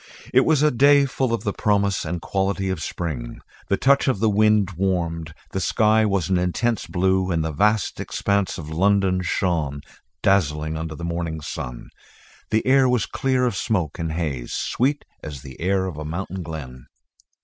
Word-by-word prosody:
It 130 +1 +5
was 150 -3 +3
a 150 - +4
day 140 +3 +5
full 130 -2 -1
of 115 -3 -1
the 100 -3 -1
promise 100 -3 +1
and 85 +1 -4
quality 95 0 -1
of 90 -4 -3
spring. 75 -8 -4 0.3
The 100 - +1
touch 140 +1 +3
of 130 - +2
the 110 +2 +2
wind 105 -1 +3
warmed. 85 -3 -2 0.2
The 95 - -2
sky 110 +2 +3
was 100 -5 0
an 95 -2 +2
intense 110 +6 0
blue 95 0 +1
and 80 -3 0
the 80 - -2
vast 105 +6 +1
expanse 100 -2 -1
of 80 -3 -7
London 95 +2 +2
shone 80 -6 -1 0.4
dazzling 80 -5 +2
under 80 0 -4
the 85 - -6
morning 85 -1 -3
sun. 60 -4 -7 0.6
The 110 - +1
air 130 0 +5
was 125 -5 +2
clear 130 -1 0
of 120 - 0
smoke 90 - -1
and 80 -1 -2
haze, 75 -8 -3
sweet 140 +4 0 0.2
as 70 -4 -8
the 65 0 -11
air 95 +1 +1
of 90 -6 -5
a 75 - -5
mountain 90 +4 -4
glen. 70 -7 -8
95 Hz, 180 wpm, -23 LUFS, 80-105 Hz, 0.6 s, It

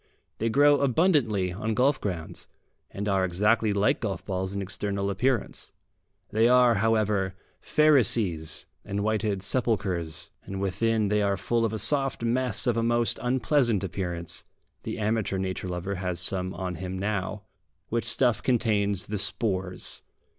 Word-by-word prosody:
They 115 - 0
grow 145 +4 +5
abundantly 125 - +2
on 105 +3 -3
golf 135 +4 +2
grounds, 85 -6 -5 0.4
and 100 +1 -5
are 95 -2 +2
exactly 105 +5 +2
like 100 +1 +2
golf 95 -6 -4
balls 95 0 -3
in - - -2
external 100 0 -2
appearance. 120 +2 -1 0.6
They 110 +2 +3
are, 125 -1 +5
however, 105 -4 +1 0.2
Pharisees 115 - +3 0.2
and 100 0 -3
whited 105 -3 -1
sepulchres, 95 -8 -1
and 95 0 -7
within 105 +3 0
they 105 0 +2
are 100 -1 +1
full 115 +6 0
of 110 - -1
a 110 - -3
soft 135 +3 +3
mess 125 0 0
of 120 -2 +1
a - - +2
most 120 0 +1
unpleasant 125 - +1
appearance 90 -3 -4 0.4
the - - -5
amateur 110 -2 -1
nature 95 0 -3
lover 90 +2 -3
has 90 -2 -2
some 95 +1 -1
on 90 -1 -4
him 95 0 -4
now 100 0 -3 0.5
which 115 0 -1
stuff 120 +1 +1
contains 105 -6 +1
the 105 -1 -4
spores. 95 -4 -1
105 Hz, 145 wpm, -27 LUFS, 95-115 Hz, 0.6 s, grow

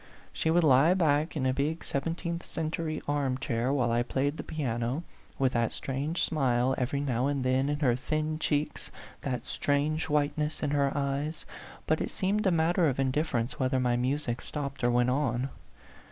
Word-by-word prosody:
She 160 - 0
would 170 +1 +4
lie 150 +4 +6
back 155 -2 +2
in 130 - 0
a 130 - +2
big 150 +4 -1
seventeenth 170 +4 -2
century 160 0 -3
arm 140 -3 0
chair 125 -1 -1
while 125 -4 +1
I 120 +1 +2
played 140 +5 -1
the - - -5
piano, 130 -1 -2 0.3
with 130 -1 +2
that 115 -1 +1
strange 140 +5 -2
smile 130 -4 +2
every 130 +2 -1
now 130 -2 0
and 140 -2 -1
then 130 +2 +2
in 145 +1 -2
her 125 -5 +3
thin 155 +4 -2
cheeks, 150 -1 -1 0.3
that 125 -3 -3
strange 155 +3 0
whiteness 150 +1 0
in 145 - 0
her 140 -1 +2
eyes; 145 +3 -2 0.4
but 155 - +1
it - - -1
seemed 200 +2 0
a - - +4
matter 165 +1 +3
of 135 -2 -1
indifference 130 -3 0
whether 130 0 +1
my 125 -1 +2
music 125 -1 -1
stopped 140 -3 -4
or 120 - +4
went 120 +1 +3
on. 130 -1 0
140 Hz, 180 wpm, -29 LUFS, 130-155 Hz, 0.4 s, lie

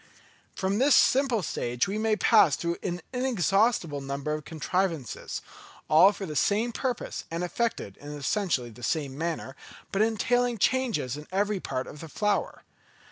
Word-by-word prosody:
From 195 +2 0
this 275 +2 +5
simple 255 -6 +4
stage 120 -3 -1
we 205 +2 -2
may 220 0 +2
pass 210 - +5
through 170 0 -2
an 175 -1 -3
inexhaustible 205 - +1
number 140 +2 -3
of 155 -1 -5
contrivances, 165 - -2 0.4
all 170 +6 +7
for 200 -1 -6
the 155 -4 -6
same 210 - +2
purpose 250 +1 -3
and 165 +2 -3
effected 180 - -2
in 145 +1 -9
essentially 145 - -1
the 110 - -14
same 140 +1 -1
manner, 160 -3 -3 0.4
but 195 - +1
entailing 235 +2 +1
changes 225 - 0
in 150 - -10
every 205 +1 0
part 130 -6 -3
of 150 - -10
the 165 - -9
flower. 210 +5 -1
185 Hz, 155 wpm, -27 LUFS, 150-220 Hz, 0.4 s, all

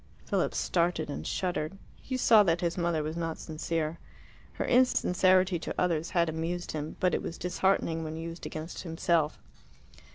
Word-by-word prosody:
Philip - - 0
started 170 -3 0
and - - -5
shuddered. 180 -1 -2 0.2
He 260 - -4
saw 225 -3 +6
that 175 -3 +2
his 170 -1 0
mother 170 -3 0
was 155 +2 -3
not 165 -1 -3
sincere. 160 0 -3 0.5
Her - - -2
insincerity 185 -7 +3
to - - -5
others 170 -2 +1
had 170 0 +4
amused 165 +2 -3
him, 155 0 -4
but 180 - +2
it - - +1
was 165 - -5
disheartening 180 -2 0
when 160 0 -5
used 165 +1 -6
against 155 +2 -6
himself. 165 -2 0
170 Hz, 160 wpm, -29 LUFS, 160-180 Hz, 0.5 s, saw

